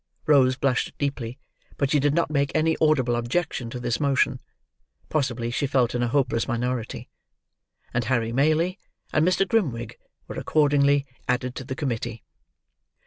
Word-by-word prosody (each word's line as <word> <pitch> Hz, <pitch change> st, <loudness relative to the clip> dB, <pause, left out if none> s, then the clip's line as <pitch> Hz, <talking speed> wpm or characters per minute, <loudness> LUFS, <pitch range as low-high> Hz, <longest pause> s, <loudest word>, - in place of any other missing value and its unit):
Rose 130 Hz, -4 st, +5 dB
blushed 130 Hz, -1 st, 0 dB
deeply, 130 Hz, -4 st, -3 dB, 0.4 s
but 140 Hz, -1 st, 0 dB
she 150 Hz, -, +4 dB
did 145 Hz, +1 st, +2 dB
not 170 Hz, -2 st, +1 dB
make 140 Hz, -1 st, +1 dB
any 160 Hz, +1 st, +3 dB
audible 135 Hz, -6 st, +3 dB
objection 120 Hz, +1 st, -2 dB
to 125 Hz, -, -6 dB
this 120 Hz, -1 st, -1 dB
motion 135 Hz, -2 st, +2 dB, 0.7 s
(possibly 120 Hz, -6 st, -1 dB
she 140 Hz, +3 st, 0 dB
felt 130 Hz, -3 st, +2 dB
in 120 Hz, -, -1 dB
a 120 Hz, -, +1 dB
hopeless 125 Hz, -2 st, +1 dB
minority); 120 Hz, -1 st, -3 dB, 0.9 s
and 120 Hz, -1 st, 0 dB
Harry 115 Hz, -1 st, 0 dB
Maylie 155 Hz, +8 st, +2 dB, 0.3 s
and 155 Hz, -, +3 dB
Mr. 195 Hz, +1 st, +2 dB
Grimwig 130 Hz, -, -1 dB, 0.3 s
were -, -, -7 dB
accordingly 145 Hz, -2 st, +3 dB, 0.2 s
added 125 Hz, 0 st, 0 dB
to 130 Hz, -, -6 dB
the 130 Hz, +1 st, -5 dB
committee. 120 Hz, -5 st, -3 dB
130 Hz, 150 wpm, -25 LUFS, 120-145 Hz, 0.9 s, Rose